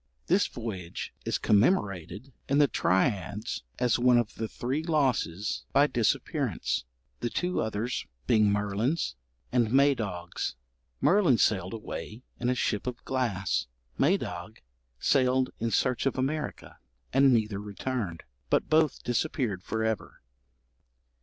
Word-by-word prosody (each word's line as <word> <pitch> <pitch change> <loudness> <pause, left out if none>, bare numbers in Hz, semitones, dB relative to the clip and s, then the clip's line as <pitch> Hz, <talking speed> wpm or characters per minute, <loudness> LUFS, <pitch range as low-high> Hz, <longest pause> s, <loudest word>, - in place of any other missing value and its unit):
This 190 +4 +3
voyage 100 -8 -6
is - - 0
commemorated 100 - +1 0.2
in 140 - +3
the 145 -1 +6
triads 105 +1 0 0.2
as 125 -2 +2
one 125 0 +5
of 120 -3 0
the 110 - -3
Three 130 +7 -2
Losses 130 - 0
by 145 - +6
Disappearance, 125 - 0 0.3
the 120 - -1
two 180 +7 -1
others 110 +3 -2 0.2
being 105 - +4
Merlin's 105 - 0 0.4
and 120 -3 +2
Madog's. 120 - +1 0.5
Merlin 180 - +5
sailed 95 -3 +1
away 110 +1 -7 0.2
in 120 - 0
a 125 - +2
ship 110 -2 -1
of 125 -1 -5
glass; 115 -8 0 0.3
Madog - - 0 0.4
sailed 130 -1 +3
in 115 - 0
search 125 +3 +1
of 135 - -1
America; 150 +4 -3 0.3
and 135 +1 +6
neither 110 -4 +1
returned, 105 -3 -4 0.3
but - - +1
both 155 -2 +3
disappeared 120 - -1
for 110 +4 -2
ever. 110 -2 -3
120 Hz, 125 wpm, -28 LUFS, 105-135 Hz, 0.5 s, the